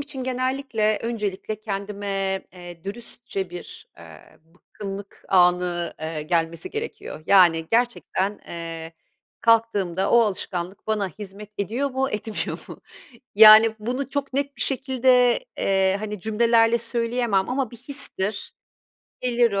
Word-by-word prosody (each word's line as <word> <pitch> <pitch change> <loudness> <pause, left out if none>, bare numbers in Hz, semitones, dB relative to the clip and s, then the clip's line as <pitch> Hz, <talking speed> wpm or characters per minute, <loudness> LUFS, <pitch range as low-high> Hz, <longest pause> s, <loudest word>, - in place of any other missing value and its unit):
için 280 -3 -6
genellikle 255 -4 0
öncelikle 215 -2 -3
kendime, 195 -2 -3
eee, 175 -2 -11
dürüstçe 200 -3 -5
bir, 175 - -10
eee, 80 -2 -15
bıkkınlık 195 +4 -10
anı, 180 -2 +2
eee, 155 -1 -4
gelmesi 165 +1 -1
gerekiyor. 435 - -6
Yani 170 -4 +5
gerçekten, 225 -4 0
eee, 165 -1 -6 0.5
kalktığımda 205 -5 +2
o 235 - +6
alışkanlık 190 -3 -3
bana 210 -3 0
hizmet 205 +2 -10
ediyor 240 +8 -1
mu, 265 +1 -1
etmiyor 210 +1 -4
mu? - - -10 0.5
Yani, 220 +1 +9
bunu 250 +5 -3
çok 280 -1 -3
net 280 +1 -2
bir - - -1
şekilde, 260 - +3 0.2
eee, 195 0 +2
hani, 210 -2 -5
cümlelerle 230 +2 +3
söyleyemem 230 -3 0
ama 255 -2 -1
bir 235 - -11
histir, 225 -6 -3 0.7
gelir 240 -2 +2
o, 200 - 0
210 Hz, 120 wpm, -24 LUFS, 190-240 Hz, 0.7 s, Yani